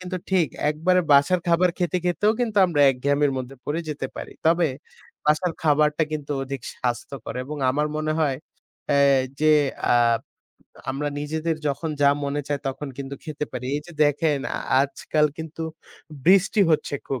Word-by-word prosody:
কিন্তু 185 0 -4
ঠিক। 180 -5 +3 0.2
একবারে 180 +4 +2
বাসার 140 +6 +5
খাবার 175 +2 +4
খেতে, 175 -1 0
খেতে, 180 +3 -1
ও - - +3
কিন্তু 225 -3 -1
আমরা 160 -5 0
একঘেয়েমি 140 +3 +1
মধ্যে 130 +1 -7
পড়ে 155 +3 -2
যেতে 145 -3 -3
পারি। - - -7
তবে 165 -1 +4 0.6
বাসার 155 +3 +2
খাবারটা 150 0 +3
কিন্তু 150 -1 -3
অধিক 135 0 -5
স্বাস্থ্যকর 125 0 -4
এবং 150 +3 -6
আমার 150 +3 0
মনে 155 0 -1
হয় 140 -4 +1 0.5
অ্যা 145 -1 +3 0.4
যে 155 0 +5 0.4
আ - - +5 1.0
আমরা 145 +2 -2
নিজেদের 160 +2 -2
যখন 155 +3 -2
যা 140 - +7
মনে 140 +1 -1
চায় 145 -1 -1
তখন 140 +2 -5
কিন্তু 140 0 -5
খেতে 150 -2 -4
পারি। 125 -1 -5
এই 145 - -1
যে 175 - -11
দেখেন 145 0 +1 0.2
আ - - -2 0.2
আজকাল 150 +2 +1
কিন্তু 160 0 -6 0.6
বৃষ্টি 195 +4 +4
হচ্ছে 155 -2 +1
খুব। 135 -2 -3
150 Hz, 165 wpm, -24 LUFS, 140-165 Hz, 1.0 s, যা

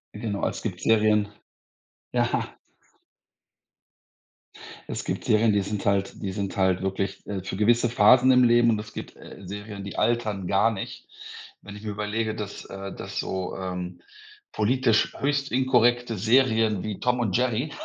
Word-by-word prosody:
Genau, 105 -2 -2
es - - -5
gibt 95 -6 -4
Serien 105 -1 +3 0.8
ja. - - -1 2.3
Es - - -4
gibt - - -4
Serien, 110 +1 +4
die 100 - +2
sind 100 0 -4
halt 100 -1 +1
die 95 - -3
sind 100 0 -4
halt 95 -1 +2
wirklich, 95 0 -3
äh, 100 -2 -4
für 95 - -5
gewisse 120 +3 +3
Phasen 125 +3 +6
im 125 0 +5
Leben 120 0 +5
und 110 - +2
es 105 0 -9
gibt, - - -8
äh, - - -12
Serien, 100 +1 -7
die 100 - -7
altern 110 -6 0
gar 100 +4 +3
nicht. 100 -3 -7 0.5
Wenn 105 - -10
ich 105 - -10
mir 110 - -4
überlege, 105 +1 -2
dass 105 -2 -7
äh, 100 0 -7
dass - - -6
so, 95 -1 -3
ähm, 90 -1 -5 0.5
politisch 115 +1 +2
höchst 140 0 0
inkorrekte 120 -2 +2
Serien 110 -2 +2
wie 105 -2 -4
Tom 125 0 +1
und 110 -6 0
Jerry 125 +4 0
105 Hz, 160 wpm, -25 LUFS, 100-120 Hz, 2.3 s, Phasen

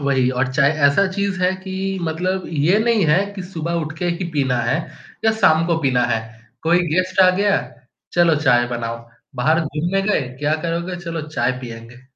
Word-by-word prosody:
वही 135 -3 +1
और 130 +1 -1
चाहे 140 +1 +4 0.2
ऐसा 150 +8 +3
चीज़ 200 -1 -2
है 180 - +3
कि 190 0 -9 0.3
मतलब 180 +3 -2 0.2
ये 190 +5 +4
नहीं 225 -3 +2
है 170 +7 +3
कि 190 - -6
सुबह 170 -2 -5
उठ 155 - -6
के 175 - -1
ही 170 +2 -2
पीना 135 -4 +1
है, 130 +6 +1 0.5
या 220 - +4
शाम 165 -4 +4
को 170 -1 +1
पीना 125 -3 +2
है। 115 -2 0 0.4
कोई 170 +2 +3 0.2
गेस्ट 185 +1 +1
आ 185 - +7
गया? 205 +1 +3 0.5
चलो 170 -2 +4
चाय 120 -3 +4
बनाओ। 115 0 -4 0.4
बाहर 155 +7 +2
घूमने 170 +6 -1
गए 205 -4 +1 0.2
क्या 150 +2 +1
करोगे? 170 +2 -3
चलो 165 -1 -3
चाय 150 -4 0
पिएँगे। 120 0 -10
165 Hz, 190 wpm, -20 LUFS, 135-185 Hz, 0.5 s, आ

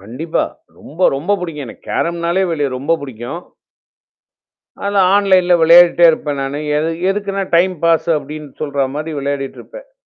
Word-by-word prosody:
கண்டிப்பா. 125 - -3 0.3
ரொம்ப 170 +5 0
ரொம்ப 180 +9 0
புிடிக்கும். 155 -6 -6
எனக்கு 115 - -13
கேரம்னாலே 170 +2 0
வெளி 145 -5 -1
ரொம்ப 145 +6 0
பிடிக்கும். 130 +3 -7 1.5
அத 200 0 -1 0.2
ஆன்லைன்ல 185 -3 +3
விளையாடிட்டே 170 +1 +6
இருப்பேன் 150 -3 -3
நானு. 135 +1 -3 0.2
எது 160 +2 -1 0.2
எதுக்குன்னா 195 0 -2
டைம் 185 +2 +2
பாஸ் 165 0 +2
அப்டின்னு 150 0 -9
சொல்ற 140 -2 -1
மாரி 155 +1 -4
விளையாடிட்டு 140 -1 -4
இருப்பேன். - - -13
160 Hz, 135 wpm, -16 LUFS, 140-180 Hz, 1.5 s, விளையாடிட்டே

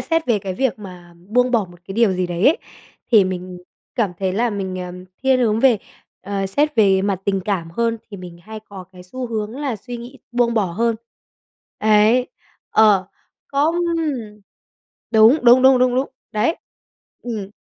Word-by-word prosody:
xét 325 -3 -1
về 230 -4 +2
cái 190 -1 -5
việc 260 -2 -1
mà 180 -3 -12
buông 250 +3 +2
bỏ 230 -5 +2
một 175 - -16
cái 195 - -7
điều 225 -3 +3
gì 180 -1 -1
đấy 175 +2 0
ấy, 310 - +4 0.5
thì 210 -4 +7
mình 180 -1 -5 0.4
cảm 210 -7 0
thấy 190 -1 -1
là 235 +5 0
mình, 190 -3 -4
ờm, 180 +1 -9 0.2
thiên 265 -1 +3
hướng 220 -2 +1
về 250 -6 +4 0.4
ờ, 195 0 -2
xét 295 +9 0
về 195 -3 +4
mặt 195 -2 -1
tình 195 -1 0
cảm 180 -6 -2
hơn, 230 +4 -1
thì 200 - -7
mình 175 -2 -10
hay 220 +2 -9
có 195 -3 -11
cái 180 -1 -13
xu 250 +7 -6
hướng 215 -2 -3
là 275 -6 -3
suy 240 +4 -8
nghĩ 245 +3 -11
buông 240 -1 +1
bỏ 215 -3 +2
hơn. 230 +3 0 0.8
Ấy. 215 +4 +3 0.4
Ờ, 205 -4 +4 0.4
không. 295 +4 +1 1.4
Đúng, 225 +6 +6
đúng, 245 +2 +7
đúng, 265 -1 +6
đúng, 250 0 +2 0.4
đấy. 215 +10 +1 0.7
Ừm. 215 -5 -5
215 Hz, 175 wpm, -20 LUFS, 190-245 Hz, 1.4 s, thì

